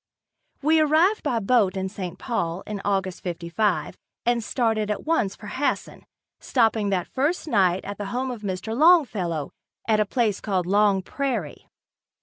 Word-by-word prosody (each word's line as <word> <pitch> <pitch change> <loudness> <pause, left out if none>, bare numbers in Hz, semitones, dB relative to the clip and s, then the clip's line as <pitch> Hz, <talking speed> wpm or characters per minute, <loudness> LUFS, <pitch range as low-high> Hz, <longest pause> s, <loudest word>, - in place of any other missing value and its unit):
We 315 +2 +4
arrived 315 +7 +3
by 255 -6 0
boat 200 -3 +2
in 190 0 -1
St. 185 -2 -6
Paul 190 -8 -2
in 210 -2 -5
August 190 -2 -1
'55 180 +3 -1 0.3
and 235 -1 +1
started 220 -2 0
at 210 - -3
once 305 -12 +1
for - - -13
Hasson, 260 +7 -3 0.3
stopping 225 -4 +1
that 185 -3 0
first 300 +6 -1
night 190 - +2
at 200 0 -6
the 205 - -3
home 255 +6 -2
of 235 -4 -7
Mr. 200 +2 -4
Longfellow, 220 - +3 0.4
at 215 -1 +3
a 215 - +3
place 220 -3 0
called 190 -4 -1
Long 200 0 +3
Prairie. 235 - -3
210 Hz, 155 wpm, -24 LUFS, 190-250 Hz, 0.4 s, We